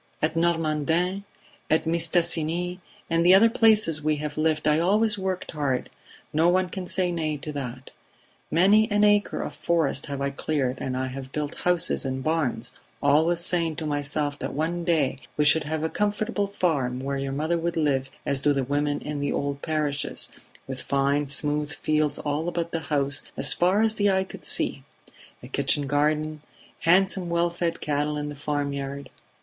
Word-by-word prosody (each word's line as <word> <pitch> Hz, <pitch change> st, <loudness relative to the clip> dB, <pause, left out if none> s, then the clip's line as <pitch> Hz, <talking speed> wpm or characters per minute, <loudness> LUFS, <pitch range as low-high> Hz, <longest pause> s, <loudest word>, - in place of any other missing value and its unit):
"At 155 Hz, +1 st, 0 dB
Normandin, 165 Hz, +3 st, 0 dB, 0.4 s
at 160 Hz, +1 st, +2 dB
Mistassini 170 Hz, +1 st, +1 dB, 0.3 s
and 165 Hz, 0 st, +1 dB
the 180 Hz, +2 st, +7 dB
other 225 Hz, +4 st, +6 dB
places 215 Hz, -10 st, +4 dB
we 155 Hz, 0 st, +2 dB
have 150 Hz, 0 st, -5 dB
lived 155 Hz, -1 st, 0 dB
I 150 Hz, +1 st, +4 dB
always 210 Hz, +5 st, +2 dB
worked 190 Hz, -1 st, -3 dB
hard; 140 Hz, -5 st, -2 dB, 0.4 s
no 160 Hz, +3 st, +4 dB
one 185 Hz, 0 st, +2 dB
can 185 Hz, 0 st, -6 dB
say 180 Hz, -1 st, 0 dB
nay 155 Hz, -3 st, -2 dB
to 150 Hz, +2 st, -6 dB
that. 130 Hz, -2 st, -6 dB, 0.6 s
Many 205 Hz, +6 st, +4 dB
an 205 Hz, 0 st, +2 dB
acre 205 Hz, 0 st, +3 dB
of -, -, -6 dB
forest 160 Hz, -5 st, 0 dB
have 140 Hz, -1 st, -4 dB
I 140 Hz, 0 st, -1 dB
cleared 135 Hz, -3 st, -2 dB
and 130 Hz, -1 st, -2 dB
I 130 Hz, -, -1 dB
have 130 Hz, 0 st, -7 dB
built 150 Hz, +1 st, -3 dB
houses 180 Hz, -1 st, +1 dB
and 130 Hz, -1 st, -3 dB
barns, 145 Hz, -7 st, -1 dB, 0.3 s
always 160 Hz, +4 st, +3 dB
saying 170 Hz, -3 st, 0 dB
to 160 Hz, -, -4 dB
myself 145 Hz, 0 st, -2 dB
that -, -, -4 dB
one 165 Hz, +3 st, -1 dB
day 155 Hz, -6 st, +1 dB, 0.2 s
we 150 Hz, -, +3 dB
should 150 Hz, +1 st, +4 dB
have 155 Hz, +1 st, -2 dB
a -, -, +1 dB
comfortable 210 Hz, +2 st, -1 dB
farm 145 Hz, -10 st, -1 dB
where 140 Hz, +1 st, -2 dB
your 135 Hz, 0 st, -3 dB
mother 155 Hz, +5 st, -1 dB
would 170 Hz, 0 st, -2 dB
live 135 Hz, -4 st, +1 dB, 0.2 s
as 140 Hz, -, +1 dB
do 145 Hz, +1 st, +2 dB
the 135 Hz, -1 st, 0 dB
women 145 Hz, +2 st, -1 dB
in 150 Hz, -1 st, -4 dB
the 145 Hz, 0 st, -1 dB
old 140 Hz, 0 st, -2 dB
parishes, 150 Hz, -3 st, -2 dB, 0.4 s
with 130 Hz, -1 st, -6 dB
fine 140 Hz, +1 st, +1 dB
smooth 150 Hz, +2 st, 0 dB
fields 155 Hz, -1 st, 0 dB
all 150 Hz, +3 st, -2 dB
about 170 Hz, -1 st, -3 dB
the 165 Hz, -, -1 dB
house 140 Hz, -2 st, 0 dB, 0.2 s
as -, -, +3 dB
far 185 Hz, +5 st, +2 dB
as 220 Hz, -1 st, +2 dB
the 205 Hz, -2 st, +2 dB
eye 190 Hz, -1 st, +2 dB
could 190 Hz, -, -11 dB
see, -, -, +2 dB, 0.6 s
a -, -, -8 dB
kitchen 140 Hz, +2 st, +1 dB
garden, 150 Hz, +2 st, 0 dB, 0.4 s
handsome 185 Hz, +1 st, +3 dB
well 170 Hz, 0 st, +1 dB
fed 170 Hz, -1 st, -2 dB
cattle 150 Hz, 0 st, -1 dB
in 150 Hz, 0 st, -3 dB
the 145 Hz, -, -7 dB
farm 145 Hz, 0 st, -2 dB
yard 140 Hz, 0 st, -6 dB
155 Hz, 180 wpm, -25 LUFS, 145-175 Hz, 0.6 s, the